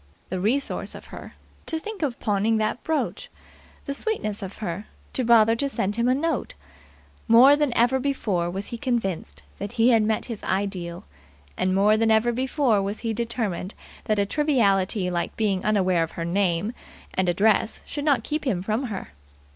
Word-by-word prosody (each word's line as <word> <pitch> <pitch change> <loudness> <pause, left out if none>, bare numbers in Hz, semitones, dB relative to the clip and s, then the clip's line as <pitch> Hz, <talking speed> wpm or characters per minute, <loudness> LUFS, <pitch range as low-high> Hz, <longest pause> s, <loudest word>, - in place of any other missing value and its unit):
The 185 - -2
resource 245 +9 -1
of - - -10
her, - - -9 0.3
to 320 - -1
think 425 +5 -7
of 275 -6 -2
pawning 215 +1 +1
that 215 +3 -1
brooch! 320 -1 -2 0.6
The 280 - -2
sweetness 250 - -1
of 195 0 -6
her 205 0 -5 0.3
to 260 - +2
bother 225 -1 +5
to 280 +3 0
send 205 -6 -1
him 235 +1 +1
a 255 - +3
note! 300 - -2 0.7
More 250 +5 +8
than 295 -2 +1
ever 245 +3 +3
before 215 -11 -1
was 195 +3 -4
he 235 - -6
convinced 195 - -2 0.2
that 205 - -5
he 230 +1 +4
had 230 -3 +5
met 215 0 0
his 230 -4 -6
ideal, 185 -3 -2 0.5
and 185 0 0
more 210 +2 +4
than 225 0 +2
ever 220 +2 +4
before 255 -3 +1
was 200 +2 -3
he 225 -1 -1
determined 220 -5 -3 0.3
that 215 - +1
a 200 - +2
triviality 200 -8 +1
like 175 -1 -2
being 200 -4 0
unaware 185 -5 +2
of 165 - -2
her 165 - -4
name 185 +3 0 0.4
and 185 -1 +1
address 205 +4 +2
should 290 - -4
not 280 -7 +2
keep 305 +4 -2
him 195 -11 -1
from 220 +6 -1
her. 205 -6 -5
220 Hz, 180 wpm, -24 LUFS, 195-250 Hz, 0.7 s, More